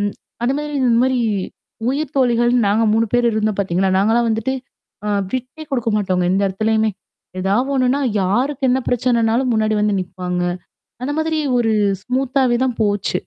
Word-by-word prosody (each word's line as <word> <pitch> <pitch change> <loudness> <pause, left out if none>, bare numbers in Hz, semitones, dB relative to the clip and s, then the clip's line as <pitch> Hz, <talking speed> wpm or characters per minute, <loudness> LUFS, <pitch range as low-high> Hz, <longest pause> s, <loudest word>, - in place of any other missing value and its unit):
ம். 205 -1 -1 0.3
அந்த 250 +3 +2
மாரி 295 0 -4
இந்த 245 - +3
மாரி 260 -1 +1 0.7
உயிர் 290 +1 -3
தோழிகள்னு 240 -3 +3
நாங்க 220 +3 +2
3 225 +1 +2
பேர் 240 -1 +3
இருந்தோம் 215 -1 0
பார்த்தீங்கன்னா, 190 0 +1
நாங்கலாம் 230 +4 +2
வந்துட்டு, 225 +4 -1 0.5
அ 210 - -1 0.2
விட்டே 255 +5 -5
குடுக்க 235 -4 0
மாட்டாங்க. 185 -3 0
எந்த 195 +1 +1
இடத்துலயுமே. 220 +2 +1 0.5
ஏதாவது 210 +8 +1
ஒண்ணுன்னா, 260 +2 +2 0.2
யாருக்கு 260 +8 0
என்ன 260 - +2
பிரச்சனைனாலும் 240 0 +1
முன்னாடி 215 0 +1
வந்து 210 -1 +1
நிப்பாங்க. 180 0 -4 0.6
அந்த 290 +3 -2
மாதிரி 315 0 0 0.2
ஒரு 225 -2 +1 0.3
ஸ்மூத்தாவே 255 0 +1
தான் 250 -3 -2
போச்சு. 205 -3 0
235 Hz, 155 wpm, -19 LUFS, 210-255 Hz, 0.7 s, இந்த